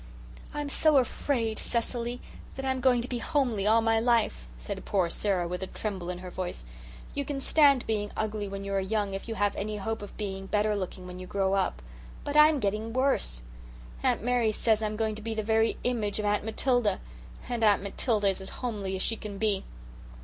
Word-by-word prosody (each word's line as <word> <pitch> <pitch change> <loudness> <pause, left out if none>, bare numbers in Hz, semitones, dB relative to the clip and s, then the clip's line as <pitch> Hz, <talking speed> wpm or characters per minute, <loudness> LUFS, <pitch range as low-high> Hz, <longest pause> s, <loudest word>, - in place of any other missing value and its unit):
"I'm 295 -1 -3
so 300 +1 +4
afraid, 240 -3 0
Cecily, 240 +1 -1 0.3
that 270 - -4
I'm 260 -1 0
going 245 -2 +4
to - - -4
be 245 -2 -3
homely 235 -7 0
all 225 +1 +5
my 225 0 +3
life," 225 - +1
said - - -6
poor 185 -4 +1
Sara 185 -4 0
with 180 +1 -4
a 190 - -3
tremble 190 -5 -4
in 180 - -3
her 180 0 -8
voice. 175 - -5 0.5
"You 285 - -1
can 280 0 -3
stand 280 -2 +4
being 210 -2 -1
ugly 215 -1 -1
when 195 0 -5
you 200 0 -4
are 195 - +2
young 200 +1 -1
if 195 - -5
you 225 - -3
have 205 -1 +1
any 210 +1 -3
hope 220 +2 -3
of 205 - -9
being 195 -2 -4
better 210 +1 +2
looking 185 -1 -4
when 180 0 -8
you 185 - -7
grow 195 0 +1
up. - - 0 0.4
But 290 - -3
I'm 300 -1 +7
getting 215 +1 -1
worse. 250 - +1 0.6
Aunt - - +1
Mary 245 -2 +2
says 220 0 +2
I'm 215 -1 -1
going 220 0 0
to 215 - -7
be 225 +1 -3
the 215 - -1
very 220 +1 +2
image 225 -5 0
of 215 - -1
Aunt 205 0 +1
Matilda. 225 -2 +1 0.5
And 240 -2 -2
Aunt 205 -2 +5
Matilda 205 +1 +1
is 195 0 -2
as 190 - -4
homely 205 -6 -3
as 190 - -2
she 225 - +1
can 210 -2 -7
be. 205 -2 +1
215 Hz, 210 wpm, -29 LUFS, 195-240 Hz, 0.6 s, I'm